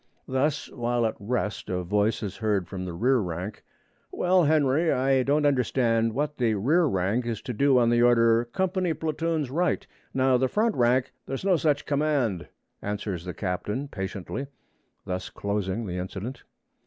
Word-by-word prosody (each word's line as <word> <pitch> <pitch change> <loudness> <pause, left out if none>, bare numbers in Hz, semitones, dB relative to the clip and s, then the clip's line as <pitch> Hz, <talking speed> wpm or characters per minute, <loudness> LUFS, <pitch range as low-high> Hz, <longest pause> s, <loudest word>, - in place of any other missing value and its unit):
Thus, 140 +3 0
while 120 -1 0
at 110 - 0
rest, 105 -1 -2
a 90 -1 -1
voice 105 +5 +1
is 100 -2 -5
heard 105 -5 0
from 95 -2 -5
the 90 - -5
rear 125 +9 +2
rank: 90 +1 -5 0.5
'Well, 180 -1 +3
Henry, 155 +1 +3
I 130 +1 +2
don't 145 +3 +2
understand 120 -4 +2
what 150 +1 -2
the 115 -3 +2
rear 150 - +3
rank 110 0 0
is 115 -3 -2
to 125 - -4
do 135 +3 +3
on 120 -1 +4
the 120 0 +3
order, 115 -1 +4
"Company 185 - -1
platoons 160 -3 -2
right." 175 +5 0 0.3
Now 130 -1 +3
the 130 +1 +2
front 215 - +1
rank 125 0 +2
' - - -50
'There's 135 +7 -4
no 190 -2 +4
such 150 -3 +1
command,' 140 - 0 0.3
answers 100 -4 -4
the 90 - -5
captain 105 +8 -3
patiently, 95 +7 -5 0.6
thus 90 0 -4
closing 100 +1 -2
the 90 -2 -4
incident. 100 +8 -6
120 Hz, 165 wpm, -26 LUFS, 105-145 Hz, 0.6 s, on